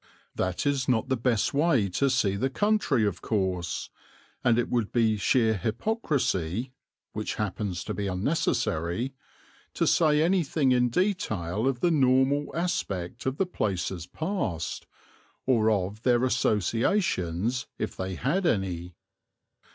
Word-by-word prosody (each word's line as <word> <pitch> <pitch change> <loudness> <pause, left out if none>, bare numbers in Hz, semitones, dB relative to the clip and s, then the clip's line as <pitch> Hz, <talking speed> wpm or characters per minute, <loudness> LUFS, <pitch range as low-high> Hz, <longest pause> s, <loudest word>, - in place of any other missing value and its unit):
That 90 +6 -2
is 140 -3 +1
not 120 0 +1
the 130 - +2
best 115 -1 +1
way 140 -8 +3
to 100 +10 +1
see 115 -7 +1
the 130 +7 0
country 205 - +2
of 95 -4 -2
course, 95 -5 -2 0.5
and 120 -2 +4
it 120 - +1
would 120 -4 -1
be 115 -3 +3
sheer 110 +2 +2
hypocrisy 120 - -1 0.4
(which 110 0 -3
happens 100 -3 -3
to - - -4
be 100 -1 -3
unnecessary) 95 - -1 0.6
to - - +1
say 155 -2 +4
anything 160 -6 +2
in 125 -1 +3
detail 115 - -1
of 130 -3 -1
the 175 - +3
normal 135 0 +3
aspect 130 - -2
of 130 +1 -1
the 195 - +2
places 95 - -2
passed, 115 - -3 0.6
or 115 -4 +3
of 100 0 -1
their 120 0 +3
associations 115 - 0
if - - -3
they 95 0 -4
had 165 - 0
any. 90 - -1
115 Hz, 135 wpm, -27 LUFS, 95-140 Hz, 0.6 s, and